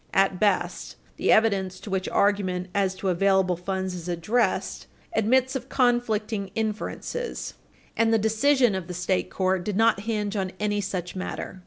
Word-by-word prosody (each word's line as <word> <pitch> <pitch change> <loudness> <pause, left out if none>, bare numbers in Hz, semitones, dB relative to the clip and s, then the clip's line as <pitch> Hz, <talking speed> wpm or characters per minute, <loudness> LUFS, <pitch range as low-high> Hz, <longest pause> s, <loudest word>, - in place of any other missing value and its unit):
At 195 -1 +3
best, 210 -2 0 0.2
the - - +2
evidence 195 -4 +2
to 205 - -8
which 190 -1 -1
argument 185 -3 +1
as 195 -2 +1
to 190 0 -2
available 190 0 +2
funds 190 +1 -3
is 180 -1 -6
addressed 195 +6 0 0.3
admits 255 +5 +2
of 265 0 -4
conflicting 225 -5 +1
inferences, 225 - -3 0.4
and 225 0 +3
the 225 - +5
decision 230 +3 +3
of 190 -2 -4
the 180 - -6
state 180 +1 0
court 185 -1 0
did 205 0 -2
not 225 -2 +4
hinge 210 -1 -2
on 190 -2 -2
any 205 0 0
such 185 -2 -4
matter. 185 0 -5
200 Hz, 160 wpm, -25 LUFS, 185-220 Hz, 0.4 s, the